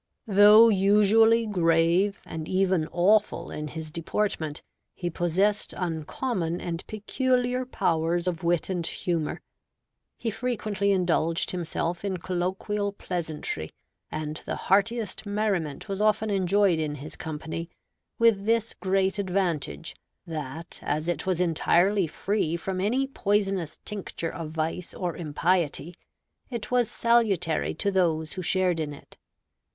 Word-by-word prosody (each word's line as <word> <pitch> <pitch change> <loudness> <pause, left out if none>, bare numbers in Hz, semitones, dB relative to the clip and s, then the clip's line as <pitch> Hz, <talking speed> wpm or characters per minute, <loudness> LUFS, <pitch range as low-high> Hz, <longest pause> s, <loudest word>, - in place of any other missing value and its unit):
Though 210 +2 +8
usually 210 +3 +5
grave 175 0 +2
and 160 -1 -6
even 185 -4 +2
awful 190 -1 +2
in 150 0 -4
his 155 0 -7
deportment, 165 -2 -2 0.3
he 175 -1 -3
possessed 190 +5 0
uncommon 175 - -2
and 170 0 -4
peculiar 250 +3 0
powers 170 -4 0
of 170 -2 -2
wit 170 -1 +1
and 180 -3 -2
humor; 165 -5 -2 0.8
he 225 - -2
frequently 215 -4 -1
indulged 170 -3 +1
himself 170 0 -3
in 195 -2 -1
colloquial 190 +4 -2
pleasantry; 160 - -4 0.4
and 155 0 -4
the - - -1
heartiest 205 +1 0
merriment 200 -8 -1
was 195 0 -3
often 215 0 +2
enjoyed 195 -2 +3
in 150 -2 -2
his 150 +2 -8
company, 160 +2 -5 0.5
with 220 -3 +3
this 230 0 +1
great 190 +1 0
advantage, 180 - -2 0.3
that 160 0 -5
as 155 +2 -2
it 175 +2 -2
was 185 -2 +1
entirely 180 +2 +3
free 170 0 -1
from 185 +1 -3
any 245 +7 +1
poisonous 195 - -1
tincture 195 -5 -4
of 165 -2 -5
vice 160 +2 -3
or 175 -3 -3
impiety, 170 0 0 0.6
it 235 -3 -5
was 245 -3 +3
salutary 220 -9 +1
to 200 - 0
those 160 -5 +1
who 185 - -4
shared 180 -1 +1
in 150 -2 -3
it. - - -17
185 Hz, 125 wpm, -27 LUFS, 165-205 Hz, 0.8 s, Though